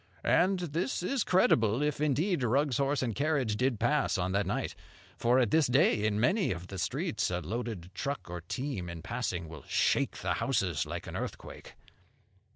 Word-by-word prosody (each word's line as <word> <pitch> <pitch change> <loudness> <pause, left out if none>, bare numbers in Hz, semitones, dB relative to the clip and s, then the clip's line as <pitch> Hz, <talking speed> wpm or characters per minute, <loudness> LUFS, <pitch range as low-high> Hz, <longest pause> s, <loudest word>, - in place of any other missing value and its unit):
And 190 +2 +4
this 170 - -2
is 270 -5 0
credible, 125 - +3
if, 150 -1 -1
indeed, 150 +4 +1
Rugg's 130 +2 +2
horse 140 0 +1
and 120 -3 -1
carriage 140 -5 0
did 125 -1 0
pass 150 -7 +2
on 90 0 -1
that 100 0 0
night. 100 - -2 0.4
For 120 +2 +2
at 120 -5 +2
this 160 -3 +4
day, 120 -4 +3
in 105 -1 +1
many 190 - +2
of 90 -1 -4
the 95 - -6
streets, - - -1
a 90 -1 -1
loaded 105 -1 -5
truck 140 +4 -4
or 90 0 -6
team 100 0 -4
in 85 -1 -7
passing 95 -8 -3
will 80 -2 -9
shake - - +1
the - - +1
houses - - 0
like - - -5
an - - -7
earthquake. - - -7
125 Hz, 180 wpm, -30 LUFS, 100-145 Hz, 0.4 s, And